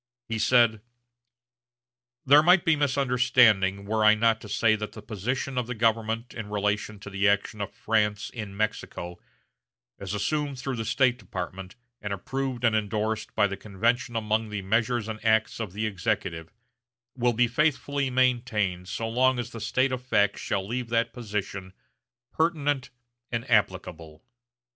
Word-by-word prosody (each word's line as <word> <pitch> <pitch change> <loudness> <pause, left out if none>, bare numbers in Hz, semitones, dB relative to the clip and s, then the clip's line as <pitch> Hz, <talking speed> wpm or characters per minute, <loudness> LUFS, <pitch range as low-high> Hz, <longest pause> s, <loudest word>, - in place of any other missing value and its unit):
He 115 -1 -3
said: 115 -2 +4 1.4
"There 145 +3 +7
might 180 +2 +5
be 165 - +4
misunderstanding 125 -8 +3
were 110 +1 0
I 105 0 +7
not 115 0 +2
to 105 - -10
say 110 +1 +3
that 105 0 -6
the 110 - -9
position 125 +5 -3
of 120 - -3
the 125 - -4
government 115 +1 0
in 110 -3 -7
relation 105 +1 -1
to 100 - -8
the 100 +1 +2
action 100 +1 -1
of 100 - -4
France 105 -2 0
in 105 -4 -7
Mexico, 90 -5 -3 0.8
as 100 +1 -4
assumed 145 +6 -1
through 130 0 -4
the 115 - -3
State 130 -1 +2
Department 95 -1 -7 0.3
and 105 - -4
approved 130 +5 -4
and 115 -2 +3
indorsed 110 +1 -2
by - - +4
the 100 -1 -2
convention 115 +4 -1
among 110 0 0
the 105 -2 -4
measures 115 +3 0
and 110 -1 -6
acts 110 0 +2
of 110 -5 -4
the 105 +3 -3
Executive 85 -5 -2 0.6
will 120 -1 +2
be 120 +2 +3
faithfully 140 +1 0
maintained 120 -8 0
so 115 - -3
long 130 +3 +2
as 120 0 -4
the 115 - -8
state 130 +5 +1
of 130 -1 -3
facts 105 -5 +1
shall 95 -1 -2
leave 120 +1 -3
that 115 0 0
position 100 -5 -5 0.6
pertinent 145 -5 0 0.4
and 115 +1 -3
applicable." 90 -7 -1
110 Hz, 160 wpm, -26 LUFS, 105-125 Hz, 1.4 s, There